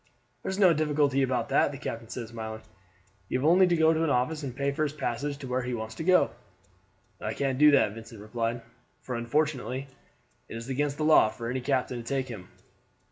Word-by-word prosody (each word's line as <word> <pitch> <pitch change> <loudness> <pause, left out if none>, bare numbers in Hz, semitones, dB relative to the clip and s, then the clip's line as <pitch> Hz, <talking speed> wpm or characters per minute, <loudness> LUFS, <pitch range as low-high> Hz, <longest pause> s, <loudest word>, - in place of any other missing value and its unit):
"There's 190 - -3
no 185 -4 +6
difficulty 145 -3 +1
about 125 -3 0
that," - - +3
the 140 - -7
captain 115 -4 -6
said 120 -2 -5
smiling; 110 -1 -7 0.7
"you - - +1
have 130 - -2
only 180 +3 +6
to 175 - +2
go 160 0 +4
to 160 0 0
an 165 - +1
office 145 +4 0
and 130 -4 -5
pay 140 +1 0
for 140 - -4
his 150 -2 0
passage 140 0 -3
to 135 - -8
where 125 +1 -1
he 125 0 -3
wants 110 -1 -5
to 160 - -6
go." 185 +2 +4 0.9
"I - - -3
can't 135 -2 -1
do 150 0 +8
that," 140 -8 +4
Vincent 115 0 -11
replied; 115 +2 -3 0.4
"for 125 - -6
unfortunately 130 +1 -1 0.6
it - - -6
is 115 +3 -8
against 140 +2 -1
the 155 - -1
law 155 -8 +6
for 115 +2 -5
any 130 0 -2
captain 130 -1 0
to 120 - -6
take 130 +2 -2
him." 100 -6 -8
130 Hz, 215 wpm, -28 LUFS, 115-150 Hz, 0.9 s, do